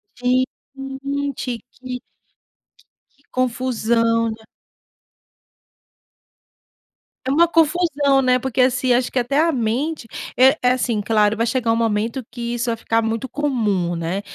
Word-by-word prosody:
Gente, 250 +1 +2 0.9
que 245 -2 -3
que 255 -1 -7 1.1
que 280 - -34
confusão, 230 -2 +1
né? 220 0 -9 2.8
É 260 - 0
uma 335 +5 +5
confusão, 305 -4 +2
né? 255 -1 +3
Porque, 260 0 -4
assim, 255 0 +3
acho 245 +1 +1
que - - -3
até 250 +4 0
a 330 +1 +3
mente 255 +3 -2 0.3
eh 265 +4 +5
eh, 250 - +4
assim, 245 -4 0
claro, 215 0 +2
vai 230 - +1
chegar 235 -1 +1
um - - +3
momento 230 +2 -1
que 235 -1 -4
isso 240 0 -1
vai 230 - 0
ficar 225 0 0
muito 225 +3 -2
comum, 215 -12 0
né? 170 +4 -2
245 Hz, 135 wpm, -21 LUFS, 225-265 Hz, 2.8 s, uma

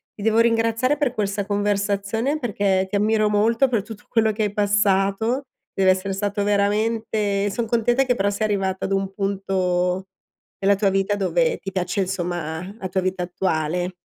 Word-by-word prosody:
ti 205 - -8
devo 225 0 +3
ringraziare 230 +4 +2
per 285 -5 0
questa 200 -3 -2
conversazione 205 +6 0
perché 200 -6 0
ti 200 - -3
ammiro 215 +1 +2
molto 230 +5 +3
per 230 -6 0
tutto 220 -2 -11
quello 220 -2 +2
che 215 +1 -2
hai 205 - -1
passato, 205 +4 +1 0.3
deve 190 -1 +4
essere 190 +1 -1
stato 205 +1 -1
veramente 205 0 0
son 230 +4 -2
contenta 240 +3 +2
che 255 -2 +1
però 200 -4 0
sei 215 +2 -1
arrivata 195 -2 -1
ad 195 - -4
un 195 0 0
punto 190 -2 -1 0.5
nella 200 +1 +3
tua 200 0 +2
vita 195 +1 +1
dove 475 - +1
ti 195 - -6
piace 185 +1 -1
insomma 175 -1 -3
la 190 - -5
tua 190 +1 0
vita 185 -1 -2
attuale. 175 0 -1
200 Hz, 170 wpm, -22 LUFS, 190-220 Hz, 0.5 s, deve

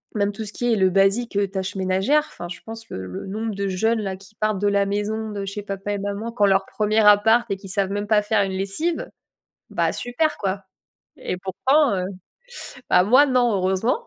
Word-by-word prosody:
Même 205 -1 +1
tout 215 +2 -6
ce 210 - -7
qui 245 0 -1
est - - +3
le 190 -1 +4
basique, 195 +5 +2
heu, 200 0 +2
tâches 190 0 -4
ménagères. 190 +11 +2
Enfin, 175 - -7
je 175 0 -8
pense 225 0 -9
le 95 - -6
le 90 - -7
nombre 215 +3 -3
de 200 0 -2
jeunes, 220 +5 +1
là, 195 -2 -3
qui 195 +2 -17
partent 215 -1 0
de 205 - +1
la 200 0 +2
maison 210 +2 -2
de 200 -1 -4
chez 195 +1 -5
papa 195 0 -5
et - - -1
maman 205 +3 -4
quand 210 -3 +2
leur 195 -1 +3
premier 215 +2 0
appart 220 +3 +5
et 195 - -1
qui 195 +1 -12
savent 195 0 0
même 205 +1 -2
pas 210 0 +4
faire 210 0 +1
une 195 -1 -3
lessive. 195 - -2 0.6
Bah, - - +1
super, 295 +6 -1
quoi, 195 0 -2 0.5
et - - -4
pourtant, 260 +8 +2
heu 180 - -1 0.9
bah, 180 - +5
moi 255 +8 +6
non, 250 -3 +2
heureusement. 190 - 0
205 Hz, 220 wpm, -23 LUFS, 195-225 Hz, 0.9 s, moi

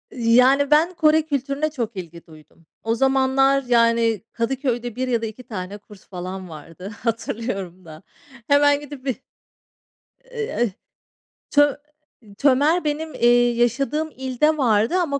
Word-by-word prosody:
Yani, 255 +4 +3
ben 325 +4 +4
Kore 315 -1 +3
kültürüne 285 0 -2
çok 235 -6 -4
ilgi 170 -2 -9
duydum. 155 +1 -19 0.2
O 225 +1 0
zamanlar, 270 +1 +2
yani, 230 -3 +2
Kadıköy'de 245 -1 -2
1 255 0 -2
ya 235 -2 0
da - - -2
2 225 +3 -8
tane 205 -4 -7
kurs 205 -1 -17
falan 185 0 -7
vardı, 165 +5 -10
hatırlıyorum 205 -6 -4
da. 155 0 -12 0.4
Hemen 285 0 +4
gidip 285 -2 -11
bir 260 - -1 1.1
Eee, - - -6 0.2
eh, 240 -4 +2 0.8
ço 290 -1 +3 0.6
Tömer 290 +6 +3
benim, 310 +1 -3
eee, 240 0 +4
yaşadığım 275 +7 0
ilde 265 +4 0
vardı 230 - +2
ama 285 -5 -1
250 Hz, 135 wpm, -22 LUFS, 220-285 Hz, 1.1 s, ben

